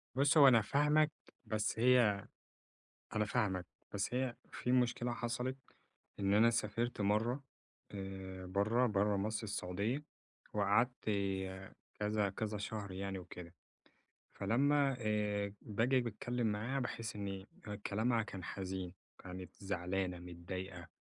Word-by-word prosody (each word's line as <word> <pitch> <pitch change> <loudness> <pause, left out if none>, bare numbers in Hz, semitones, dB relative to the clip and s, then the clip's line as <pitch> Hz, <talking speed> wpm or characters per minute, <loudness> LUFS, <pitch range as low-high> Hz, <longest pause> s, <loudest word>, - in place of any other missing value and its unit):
بُص، 140 +3 +4
هو 140 - +10
أنا 115 -4 +7
فاهمك 150 +5 +3 0.3
بس 110 0 -1
هي 115 -5 +5 0.9
أنا 105 - +3
فاهمك، 100 -5 0 0.3
بس 100 +4 -1
هي 130 -2 0 0.2
في 125 - -1
مشكلة 125 -1 +2
حصلت، 125 +2 -2 0.6
إن 100 0 +3
أنا 115 +2 +7
سافرت 115 +1 -1
مرة 110 +7 +1 0.5
آآ، 95 -1 -6
برّه 110 +6 +2
برّه 105 -1 +2
مصر 105 +3 -1
السعودية. 105 +7 -2 0.5
وقعدت 105 +5 +2 1.0
كذا 105 -1 +1
كذا 105 +1 -3
شهر 105 -2 -4
يعني 95 0 -3
وكده، 90 -1 -9 0.8
فلمّا 140 +2 +3
آآ، 105 -2 0
باجي 115 +5 +2
باتكلم 120 +1 -2
معاها 115 +6 0
باحس 115 -3 -3
إن 100 -1 -4 0.4
كلامها 115 +3 +2
كان 95 -4 -7
حزين، 95 -1 -4 0.2
كانت 90 0 -8
زعلانة 90 -1 -2
متضايقة 90 +1 -7
105 Hz, 115 wpm, -36 LUFS, 95-120 Hz, 1.0 s, هو